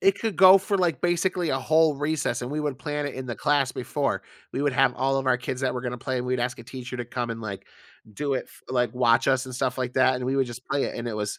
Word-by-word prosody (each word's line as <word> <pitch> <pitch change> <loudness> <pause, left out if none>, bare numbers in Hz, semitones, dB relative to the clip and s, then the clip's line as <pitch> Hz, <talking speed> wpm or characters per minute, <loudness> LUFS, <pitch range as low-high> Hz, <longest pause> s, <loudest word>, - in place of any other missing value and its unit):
it 195 +1 +3
could 220 -3 -2
go 190 +2 +9
for, 195 +1 0
like, 175 -3 0
basically 175 -1 +1
a 135 - +1
whole 155 +3 +3
recess, 145 -3 -1
and 125 +1 -5
we 150 - -2
would 145 -4 -2
plan 150 0 -3
it 140 - -5
in 130 0 -6
the 120 - -3
class 140 0 +2
before. 140 +3 -2 0.3
We 140 - -2
would 145 - +1
have 135 -1 +3
all 135 +1 +1
of 135 - -3
our 130 -1 +4
kids 125 +1 -5
that 130 - 0
were 125 - -4
gonna 125 -1 -4
play 130 0 -2
and 125 - -3
we'd 125 -1 0
ask 125 0 -2
a 115 - -8
teacher 125 0 -7
to 120 - -4
come 120 0 -3
and, 115 - -5
like, 100 -3 -6 0.5
do 145 +4 -2
it, 130 - -3
f - - -18
like, 125 -2 0
watch 120 -1 +3
us 130 -1 +2
and 130 - -7
stuff 125 0 -1
like 125 -1 -2
that, 130 0 +4
and 125 - -4
we 135 +2 0
would 135 - +2
just 120 +1 -9
play 140 -2 0
it, - - -4
and 120 0 -4
it 115 - -4
was 105 -1 -3
130 Hz, 300 wpm, -25 LUFS, 125-145 Hz, 0.5 s, go